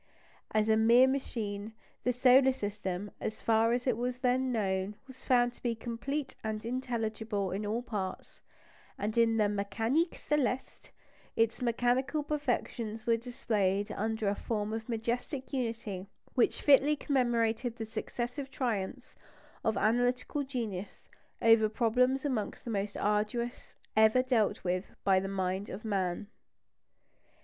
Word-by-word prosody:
As 215 0 +2
a 220 - +5
mere 235 +3 +7
machine, 220 -6 -3 0.3
the 250 - +2
solar 255 +2 +5
system, 205 -3 -4
so - - 0
far 225 +1 +2
as 245 +1 0
it 250 -4 +2
was 245 +2 -2
then 255 0 +1
known, 195 -3 -1
was 260 -1 -14
found 245 -1 +3
to - - -20
be 235 -2 0
complete 255 +5 -4
and 220 0 -3
intelligible 225 -5 -2
in 205 +2 -3
all 225 +3 -1
its 245 - -18
parts; 195 -4 -5 0.6
and 215 +1 -2
in 230 -1 +4
the 215 - +4
Mécanique 225 - 0
Céleste 265 -3 -2 0.5
its 225 +1 +1
mechanical 245 +5 +1
perfections 245 -6 -2
were 230 - +4
displayed 210 -4 -1
under 220 0 -1
a 200 - +3
form 210 0 -2
of 225 +1 -5
majestic 245 +5 -3
unity 225 -7 -3 0.3
which 250 - +2
fitly 290 +1 +6
commemorated 240 -4 +1
the 225 - -5
successive 245 +5 -4
triumphs 230 -8 -3 0.5
of 220 -2 +1
analytical 245 +6 +1
genius 230 -8 -5 0.4
over 225 -1 +6
problems 250 +5 +2
amongst 235 -8 -2
the 235 - -3
most 200 -1 -2
arduous 210 +4 -1 0.2
ever 220 +4 +5
dealt 240 -5 +1
with 180 +1 -2
by 190 -1 +4
the 195 - -3
mind 190 +1 -2
of 210 +4 -7
man. 190 -3 -1
230 Hz, 140 wpm, -31 LUFS, 210-250 Hz, 0.6 s, mere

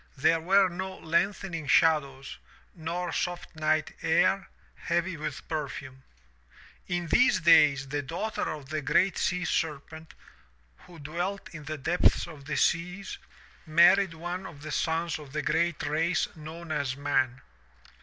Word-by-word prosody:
There 160 +3 +3
were 190 +4 +4
no 190 +2 -5
lengthening 170 -1 -1
shadows, 140 -3 +2 0.3
nor 170 +1 -4
soft 175 0 -3
night 155 0 0
air, 190 +4 +2 0.3
heavy 175 +1 -1
with 150 -3 -6
perfume. 140 -4 -5 0.9
'^n 175 -1 -1
these 250 -5 +4
days 150 -5 +5
the 145 +1 -2
daughter 175 +10 -3
of 145 -3 -7
the 155 0 -2
GREAT 175 +6 +2
SEA 180 0 0
SERPENT, 160 0 -3 0.7
who 175 - -13
dwelt 175 +7 -4
in 155 -3 -10
the 155 +1 -4
depths 165 +6 +2
of 150 -5 -12
the 145 0 -3
seas, 180 +6 0 0.5
married 170 +3 +5
one 175 +3 -5
of 145 -4 -12
the 155 - -6
sons 165 0 -1
of 140 -3 -12
the 150 0 -2
great 165 0 0
race 160 +4 +1
known 160 +1 -9
as 140 -3 -1
MAN. 135 -2 0
160 Hz, 140 wpm, -28 LUFS, 150-175 Hz, 0.9 s, days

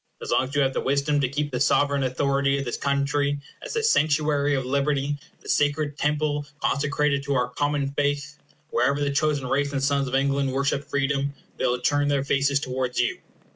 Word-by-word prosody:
As - - -6
long - - +3
as 135 +3 -8
you 145 - +3
have 135 -1 +1
the - - -1
wisdom 140 +2 +1
to 130 - +1
keep 145 +2 -2
the 125 - -2
sovereign 140 +1 +2
authority 140 +1 +1
of 140 - -3
this 120 - -2
country 140 +1 0 0.2
as - - -6
the 450 -1 -1
sanctuary 150 - +2
of 130 -1 -2
liberty, 140 +1 0 0.2
the - - -15
sacred 145 0 +1
temple 150 0 0 0.2
consecrated 145 0 +1
to 140 0 -2
our 125 -1 +1
common 145 +2 -1
faith, 145 +1 -1 0.4
wherever 140 +1 +2
the 145 -1 0
chosen 145 -1 +1
race 140 +2 0
and 135 -1 -1
sons 140 -1 +1
of 130 - -2
England 140 0 +1
worship 140 +1 0
freedom, 140 0 -1 0.2
they - - 0
will 125 0 0
turn 145 +3 +1
their 140 -2 +1
faces 140 0 +2
towards 130 -2 -2
you. - - 0
140 Hz, 200 wpm, -25 LUFS, 135-145 Hz, 0.4 s, long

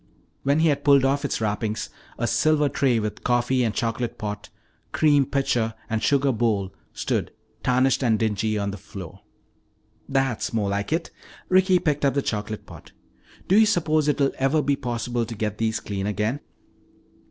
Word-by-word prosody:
When 140 +3 +2
he 165 - +4
had 145 - 0
pulled 140 -2 +5
off 140 +1 +1
its - - -1
wrappings, 110 0 -2 0.3
a - - -1
silver 155 -1 +2
tray 130 -3 +2
with 105 -1 -3
coffee 125 +1 +2
and 115 - +1
chocolate 115 +1 -2
pot, 105 0 -5 0.4
cream 145 -3 +3
pitcher 120 -5 0 0.2
and 110 -1 0
sugar 140 -1 +2
bowl 105 -5 0 0.2
stood, - - -2 0.3
tarnished 130 +1 +2
and 115 -3 +3
dingy, 110 0 0
on 100 -1 -1
the 100 - -7
floor. 95 -3 -10 0.9
"That's 135 -5 0
more 105 -3 0
like 100 +4 -2
it." 165 +2 -1 0.4
Ricky 185 0 +5
picked 150 -4 -1
up 140 -1 +2
the 140 - +1
chocolate 105 0 -3
pot. - - -13 0.5
"Do 190 - +3
you 220 - +6
suppose 155 -6 +2
it 150 - +1
will 140 -1 +2
ever 140 +3 +2
be 140 +1 +2
possible 120 -2 -2
to 115 0 -6
get 105 -1 -3
these 110 -1 0
clean 100 -1 -4
again?" 105 +6 -1
120 Hz, 175 wpm, -24 LUFS, 110-140 Hz, 0.9 s, you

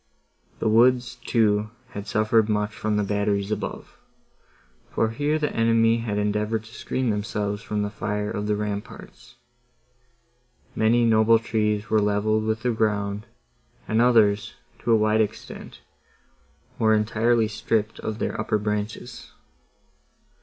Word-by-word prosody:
The - - -1
woods, 125 +2 +3
too, 105 -2 +2 0.2
had 100 0 -7
suffered 110 0 +2
much 105 0 0
from 105 +1 -1
the 105 - +1
batteries 100 0 -1
above, 110 - -5 0.9
for 110 - 0
here 145 +6 0
the 150 -1 -2
enemy 115 0 +3
had 115 -3 -3
endeavoured 105 +1 -1
to 115 +1 -15
screen 130 -3 -2
themselves 105 0 -2
from 105 -1 -2
the 105 - -3
fire 105 0 -3
of 105 0 -3
the 105 - +1
ramparts. 110 +4 -7 1.4
Many 115 +2 +3
noble 115 0 +5
trees 105 -2 -1
were 110 -1 +4
levelled 105 +1 +1
with 110 0 -2
the 125 - +2
ground, 105 -1 -1 0.6
and 110 +2 +2
others, 110 -4 +3 0.2
to 120 - -1
a - - +7
wide 110 +1 +2
extent, 105 - -6 1.0
were 110 -1 +4
entirely 115 +1 +2
stripped 110 0 -2
of 110 -1 -4
their - - -2
upper 105 - 0
branches. 105 0 -4
110 Hz, 135 wpm, -24 LUFS, 105-115 Hz, 1.4 s, a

